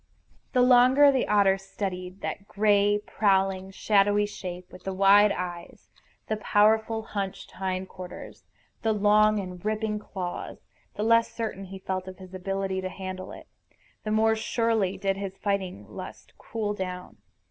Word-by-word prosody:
The 250 -2 +4
longer 255 +3 +6
the 265 -2 0
otter 195 -2 +4
studied 190 -1 -5
that 200 - -5
gray, 205 0 +3
prowling, 195 -2 +1
shadowy 205 +1 +2
shape, 180 -3 -7
with 185 - -13
the 190 -1 -4
wide 200 +2 +6
eyes, 175 -2 -6 0.4
the 215 - -1
powerful 220 +1 +2
hunched 195 -3 -5
hind 185 0 -3
quarters, 180 -1 -10 0.4
the 220 -1 +1
long 210 +1 +4
and 180 -2 -7
ripping 215 0 -1
claws, 185 -4 -6 0.3
the 210 - -2
less 230 +1 +4
certain 215 -4 -4
he 190 +1 -9
felt 190 -1 -4
of 185 -1 -8
his 185 -1 -12
ability 190 0 -2
to 185 - -3
handle 185 0 -7
it, - - -11 0.6
the 215 - -4
more 220 +1 +3
surely 220 -3 0
did 195 -1 -1
his 195 -1 -5
fighting 190 - -2
lust 105 - -10
cool 215 -2 -3
down. 180 -2 -6
195 Hz, 150 wpm, -27 LUFS, 185-215 Hz, 0.6 s, longer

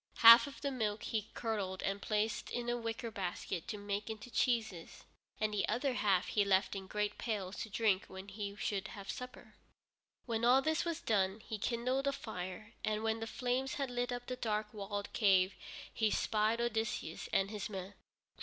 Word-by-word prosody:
Half 230 +4 +10
of 280 - -10
the 280 - -1
milk 220 -5 -1
he 215 -2 -2
curdled 200 -5 -2
and 195 +1 -1
placed 215 +2 0
in 245 -1 -2 0.2
wicker 230 0 -3
baskets 180 -3 -3
to 210 - -3
make 205 +1 -3
into 220 +2 -7
cheeses, 220 -11 0 0.4
and 215 0 0
the 205 - +1
other 260 +2 +1
half 200 -5 +2
he 210 - +3
left 195 0 +2
in 190 -1 -5
great 210 +1 -2
pails 205 -4 -2
to 220 - -4
drink 205 -2 +2
when 190 +1 -9
he 200 0 -5
should 205 -2 -2
have 200 -1 -6
supper. 250 0 -9 0.7
When 230 -2 -1
all 255 +3 +6
this 315 +3 +1
was 335 -1 -2
done, 195 -1 +1
he 215 -1 -5
kindled 255 +5 0
a 280 - +2
fire, 195 -4 -6
and 215 0 0
when 225 0 +1
the 225 - -4
flames 255 +3 -1
had 275 -3 -2
lit 245 0 -1
up 245 0 -4
the 255 - -3
dark 215 -3 -2
walled 205 -1 -4
cave 190 -3 +4 0.4
he 220 -1 +2
spied 215 +2 +1
Odysseus 225 -8 -2
and 195 +1 +2
his 210 -2 -4
men. 190 -1 -6
215 Hz, 185 wpm, -35 LUFS, 200-235 Hz, 0.7 s, Half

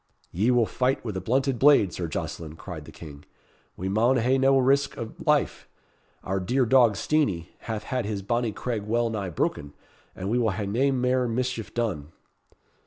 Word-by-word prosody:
"Ye 105 +8 +1
will 120 -2 +4
fight 130 +3 -1
with 105 -4 -4
a 95 - -3
blunted 130 +5 0
blade, 135 -9 +5
Sir 85 - -3
Jocelyn," 80 0 -5
cried 80 -3 -8
the - - -11
King. 75 -3 -11 0.5
"We 95 - -4
maun 115 +7 +3
hae 125 +3 +2
nae 135 +1 +4
risk 135 +2 +2
of 115 -1 -7
life. - - +1 0.6
Our 95 +1 -1
dear 125 +8 +1
dog, 120 -3 +5
Steenie, 100 - 0
hath 110 -2 -5
had 125 -3 -2
his 100 -2 -3
bonnie 120 +2 0
craig 115 +1 -3
well 115 +2 0
nigh 100 -4 -3
broken, 75 -2 -2 0.4
and 95 - -5
we 120 - +2
will 115 -2 +2
hae 100 +1 -3
nae 120 +8 +1
mair 125 -1 +1
mischief 120 -1 -2
done." 90 -11 -2
115 Hz, 180 wpm, -26 LUFS, 95-125 Hz, 0.6 s, blade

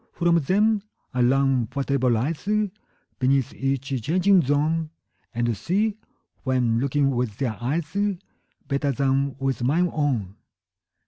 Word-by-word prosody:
From 170 -1 +2
them 205 +7 +2 0.3
I 125 - 0
learn 130 -1 +3
whatever 140 -2 +1
lies 140 - -1 0.7
Beneath 135 -1 +2
each 135 -1 -2
changing 185 - +4
zone, 155 +3 +1 0.4
And 120 -1 0
see, 205 - 0 0.4
when 125 -3 +1
looking 140 +1 +1
with 120 -5 -2
their 125 -5 -1
eyes, 150 +7 -1
35 200 +3 -1 0.5
Better 140 0 0
than 135 +1 +1
with 135 -1 -2
mine 165 +7 +2
own. 120 - -1
140 Hz, 125 wpm, -24 LUFS, 125-165 Hz, 0.7 s, changing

